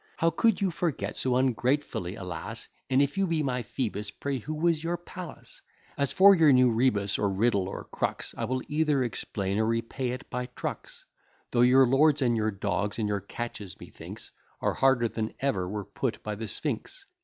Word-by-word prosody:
How 165 0 +3
could 220 +5 +2
you 190 -2 +2
forget 170 -2 -2
so 130 -1 +1
ungratefully 125 -6 0
a 100 - -8
lass, 90 -3 -6 0.2
And 135 +1 +4
if 145 +7 -2
you 195 - +2
be 165 -2 0
my 125 -2 -1
Phoebus, 105 -2 -3
pray 135 +6 -3
who 155 +7 -5
was 165 0 +1
your 170 +1 -1
Pallas? 175 0 -9 0.3
As 140 -1 0
for 200 +1 +8
your 160 -5 +6
new 125 -2 +5
rebus, 110 -4 +1
or 100 - +2
riddle, 100 -1 +1
or - - -6
crux, - - -3
I - - -2
will 130 0 -2
either 150 -3 +2
explain, 100 -4 -2
or 110 - +3
repay 115 +3 -1
it 125 +1 -5
by 125 0 -2
trucks; 125 - -6 0.5
Though 120 - +3
your 130 +2 +7
lords, 140 +3 +4
and 120 -2 +2
your 110 -1 +1
dogs, 100 0 -2
and 110 -2 0
your 100 -1 0
catches, 105 -2 -7
methinks, - - -10 0.3
Are - - 0
harder 130 -3 +3
than 110 -1 -4
ever 100 -10 0
were 105 0 -4
put - - -3
by 105 - -3
the 110 +2 -5
Sphinx. 145 - -4
125 Hz, 195 wpm, -28 LUFS, 105-145 Hz, 0.5 s, for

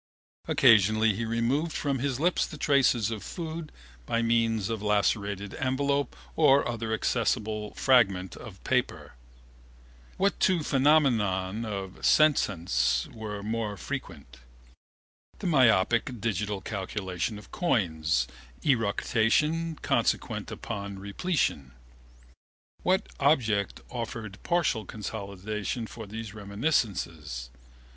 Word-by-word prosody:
Occasionally 110 0 +5
he 115 +4 -3
removed 120 +8 0
from 140 -3 -1
his 135 -1 -1
lips 175 +3 +2
the 155 - -9
traces 130 -7 +3
of 110 -2 -4
food 160 - -6 0.4
by 115 0 +1
means 115 -3 +2
of 115 -2 -3
a - - -6
lacerated 100 -1 0
envelope 140 +2 0 0.2
or 140 -3 +5
other 115 -2 -3
accessible 110 -2 -1
fragment 100 -9 +3
of - - -11
paper. - - -1 1.0
What 200 +1 +1
two 180 -4 +3
phenomena 135 -4 +4 0.4
of 95 -3 -6
senescence 90 - +3
were 105 -2 -6
more 110 -1 -2
frequent? 60 -6 -7 1.0
The - - -8
myopic 120 - +3
digital 105 -2 -2
calculation 95 0 -3
of 105 - -13
coins, 80 - +1 0.4
eructation 135 +7 +1
consequent - - 0
upon 100 -1 -5
repletion. 100 - -1 1.1
What 190 +3 +1
object 110 - +2
offered 115 -4 -6
partial 170 -10 +1
consolation 105 +2 -5
for 110 -1 -9
these 110 0 -7
reminiscences? 100 - -2
110 Hz, 105 wpm, -28 LUFS, 100-135 Hz, 1.1 s, Occasionally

